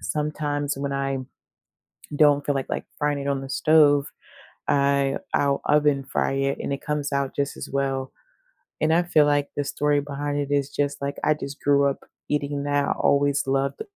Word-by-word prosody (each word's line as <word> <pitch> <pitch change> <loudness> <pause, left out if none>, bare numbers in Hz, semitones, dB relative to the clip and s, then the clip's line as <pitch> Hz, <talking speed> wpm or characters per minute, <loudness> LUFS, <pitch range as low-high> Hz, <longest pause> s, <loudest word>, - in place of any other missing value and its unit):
sometimes 145 -1 -2
when 140 0 -3
I 135 0 -1 1.0
don't 145 -1 +4
feel 145 - 0
like, 135 -1 -3
like, - - -3
frying 145 -1 0
it 140 - -5
on 140 -1 0
the 135 - -7
stove, 145 -1 +4 0.6
I 140 -1 +2 0.2
I'll 140 -1 +2
oven 145 -2 +3
fry 135 - -1
it, 135 0 -1
and - - -3
it 140 - -5
comes 150 -1 -2
out 140 -1 -1
just 140 0 -2
as - - -7
well, 135 -1 -1 0.7
and 155 +1 +3
I 170 +2 +3
feel 155 -4 +4
like 145 -1 +1
the 145 - 0
story 145 +1 +1
behind 145 0 -3
it 145 0 -3
is 140 -1 +1
just 145 0 -2
like 140 0 -3
I 155 - +4
just 140 -1 -8
grew 140 0 +3
up 140 - -4 0.3
eating 145 -1 -1
that, 145 0 0
always 140 0 +2
loved 135 - 0
145 Hz, 185 wpm, -24 LUFS, 140-145 Hz, 1.0 s, don't